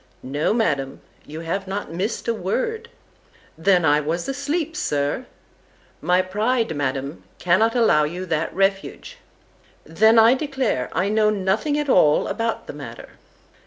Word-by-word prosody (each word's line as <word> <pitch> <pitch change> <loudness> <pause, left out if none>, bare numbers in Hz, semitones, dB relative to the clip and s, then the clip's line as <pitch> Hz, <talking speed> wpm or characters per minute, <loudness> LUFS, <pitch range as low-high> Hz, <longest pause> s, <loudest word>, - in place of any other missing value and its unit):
—No, 145 +4 -1
Madam, 145 - -1 0.3
you 155 +2 -7
have 185 +4 -3
not 195 -4 -5
miss'd 200 +8 -3
a 235 - +2
word.—Then 200 - -3
I 150 0 +4
was 165 +4 -3
asleep, 290 +4 -2
Sir.—My 165 - -3
pride, 215 0 -1
Madam, 140 +1 -3
cannot 215 +7 +2
allow 220 -11 +4
you 175 +5 -5
that 165 -2 -1
refuge.—Then, 200 - -1
I 225 +2 +7
declare, 265 - -2
I 185 - 0
know 215 0 +3
nothing 215 +8 0
at 295 -1 -2
all 150 - +4
about 230 -1 -2
the - - -8
matter. - - -9
195 Hz, 125 wpm, -22 LUFS, 160-235 Hz, 0.3 s, I